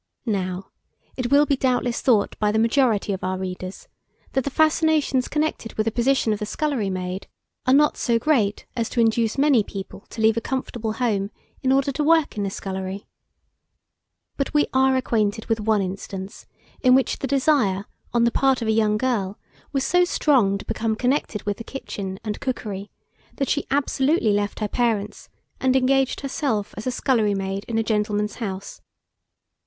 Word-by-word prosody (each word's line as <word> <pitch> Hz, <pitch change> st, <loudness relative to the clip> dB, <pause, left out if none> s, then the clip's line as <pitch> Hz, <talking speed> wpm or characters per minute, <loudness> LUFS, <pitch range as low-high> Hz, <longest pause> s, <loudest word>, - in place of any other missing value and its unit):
Now, 190 Hz, -4 st, -2 dB, 0.4 s
it 250 Hz, -2 st, -2 dB
will 285 Hz, +1 st, +5 dB
be 285 Hz, -, +2 dB
doubtless 250 Hz, -2 st, 0 dB
thought 220 Hz, -6 st, +2 dB
by 210 Hz, -1 st, +2 dB
the 215 Hz, -, 0 dB
majority 225 Hz, -3 st, +2 dB
of 190 Hz, -, -5 dB
our 185 Hz, 0 st, -1 dB
readers, 185 Hz, 0 st, -6 dB, 0.4 s
that 265 Hz, -, 0 dB
the 280 Hz, -, -2 dB
fascinations 310 Hz, -3 st, +2 dB
connected 300 Hz, -6 st, -2 dB
with 215 Hz, -, 0 dB
the 225 Hz, -, +1 dB
position 240 Hz, -1 st, +2 dB
of 210 Hz, -, -4 dB
the 210 Hz, -, -2 dB
scullery 275 Hz, -9 st, -1 dB
maid, 185 Hz, 0 st, -4 dB, 0.4 s
are 255 Hz, -, +5 dB
not 300 Hz, +1 st, +4 dB
so 235 Hz, -2 st, +2 dB
great 230 Hz, -6 st, +1 dB
as 230 Hz, -2 st, -1 dB
to -, -, -2 dB
induce 225 Hz, 0 st, +2 dB
many 275 Hz, -4 st, +4 dB
people 195 Hz, 0 st, -8 dB
to -, -, -9 dB
leave 220 Hz, 0 st, +4 dB
a -, -, +1 dB
comfortable 240 Hz, -3 st, -3 dB
home 210 Hz, -5 st, 0 dB, 0.3 s
in 260 Hz, -, +1 dB
order 275 Hz, +1 st, +3 dB
to 295 Hz, +3 st, -1 dB
work 320 Hz, 0 st, +3 dB
in 205 Hz, -1 st, -1 dB
a -, -, -1 dB
scullery. 190 Hz, 0 st, -5 dB, 1.3 s
But 275 Hz, +1 st, -2 dB
we 295 Hz, -, +5 dB
are 265 Hz, 0 st, +4 dB
acquainted 220 Hz, -4 st, 0 dB
with 225 Hz, -1 st, 0 dB
one 210 Hz, -1 st, +2 dB
instance 190 Hz, +1 st, -6 dB, 0.3 s
in 255 Hz, -1 st, +6 dB
which 265 Hz, -, +1 dB
the 270 Hz, -, -2 dB
desire, 260 Hz, -8 st, +2 dB, 0.3 s
on 235 Hz, -1 st, +2 dB
the 235 Hz, -, +3 dB
part 265 Hz, -2 st, +2 dB
of -, -, -2 dB
a -, -, +3 dB
young 215 Hz, -1 st, +2 dB
girl, 210 Hz, -5 st, -1 dB, 0.3 s
was 275 Hz, -2 st, 0 dB
so 355 Hz, +4 st, +3 dB
strong 255 Hz, -, +3 dB
to -, -, -10 dB
become 225 Hz, 0 st, -1 dB
connected 250 Hz, -3 st, -1 dB
with 205 Hz, 0 st, -2 dB
the 230 Hz, -, -7 dB
kitchen 200 Hz, -7 st, -6 dB
and 210 Hz, -2 st, -4 dB
cookery, 210 Hz, -6 st, -4 dB, 0.5 s
that 275 Hz, -, -1 dB
she 295 Hz, -, 0 dB
absolutely 275 Hz, -, +2 dB
left 205 Hz, +1 st, -1 dB
her 210 Hz, -, +1 dB
parents, 210 Hz, -3 st, -1 dB, 0.3 s
and 260 Hz, 0 st, +2 dB
engaged 265 Hz, 0 st, +2 dB
herself 265 Hz, -7 st, -2 dB
as 215 Hz, -, -6 dB
a -, -, +1 dB
scullery 225 Hz, -6 st, +1 dB
maid 195 Hz, +1 st, -3 dB
in 230 Hz, -, -2 dB
a 225 Hz, -, +2 dB
gentleman's 210 Hz, -1 st, -1 dB
house. 195 Hz, -4 st, -5 dB
225 Hz, 180 wpm, -23 LUFS, 205-265 Hz, 1.3 s, in